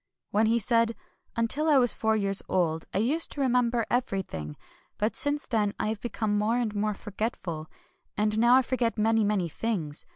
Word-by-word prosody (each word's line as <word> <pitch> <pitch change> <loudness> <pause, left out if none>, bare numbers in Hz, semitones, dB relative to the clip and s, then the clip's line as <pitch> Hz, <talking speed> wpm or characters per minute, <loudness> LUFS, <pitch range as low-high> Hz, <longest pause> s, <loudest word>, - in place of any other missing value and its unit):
Then 215 +2 +3
he 230 +1 +3
said: 230 0 +2
— - - -40
" - - -42
Until 270 +7 +1
I 295 - +6
was 245 -3 +3
four 220 0 +1
years 195 -2 +1
old 165 -3 0
I - - -2
used 275 +11 +2
to - - -8
remember 245 -3 +2
everything; 190 - -2 0.4
but 215 +2 -1
since 290 +1 0
then 210 -4 0
I 215 - 0
have 215 -1 -4
become 220 -3 -1
more 220 +3 +1
and 230 -4 -1
more 210 0 -1
forgetful; 195 -7 -4 0.5
and 210 +1 +1
now 240 +2 +6
I 260 - +5
forget 240 -2 -1
many, 225 +1 +3
many 205 -4 +1
things. 165 -5 -3
220 Hz, 195 wpm, -27 LUFS, 205-240 Hz, 0.5 s, I